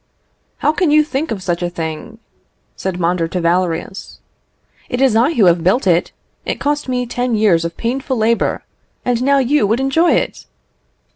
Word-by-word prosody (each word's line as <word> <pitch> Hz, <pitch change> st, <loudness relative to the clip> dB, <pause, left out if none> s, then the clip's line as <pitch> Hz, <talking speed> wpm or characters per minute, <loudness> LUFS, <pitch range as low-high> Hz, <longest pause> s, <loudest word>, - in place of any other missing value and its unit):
"How -, -, +2 dB
can 330 Hz, +1 st, 0 dB
you 305 Hz, +1 st, +5 dB
think 305 Hz, +1 st, -3 dB
of 195 Hz, -4 st, -4 dB
such 175 Hz, -1 st, -2 dB
a 175 Hz, -, -1 dB
thing?" 165 Hz, +6 st, -6 dB, 0.6 s
said 185 Hz, -2 st, -4 dB
Mondor 170 Hz, -1 st, 0 dB
to 180 Hz, +2 st, -3 dB
Valerius. 175 Hz, +2 st, -2 dB, 0.7 s
"It 245 Hz, -, -2 dB
is 265 Hz, -4 st, +3 dB
I 250 Hz, +8 st, +3 dB
who 210 Hz, -, +4 dB
have 170 Hz, -1 st, +3 dB
built 195 Hz, +8 st, +2 dB
it; 175 Hz, -2 st, +2 dB, 0.3 s
it -, -, -2 dB
has -, -, -12 dB
cost 290 Hz, -1 st, -1 dB
me 250 Hz, -1 st, -1 dB
ten 245 Hz, 0 st, -2 dB
years 200 Hz, -6 st, +3 dB
of 170 Hz, 0 st, -5 dB
painful 260 Hz, +2 st, -2 dB
labour, 225 Hz, +1 st, 0 dB, 0.4 s
and 245 Hz, -1 st, 0 dB
now 280 Hz, +2 st, +3 dB
you 270 Hz, -3 st, +2 dB
would 225 Hz, +4 st, +1 dB
enjoy 270 Hz, +6 st, +2 dB
it!" -, -, -2 dB
225 Hz, 185 wpm, -17 LUFS, 175-270 Hz, 0.7 s, you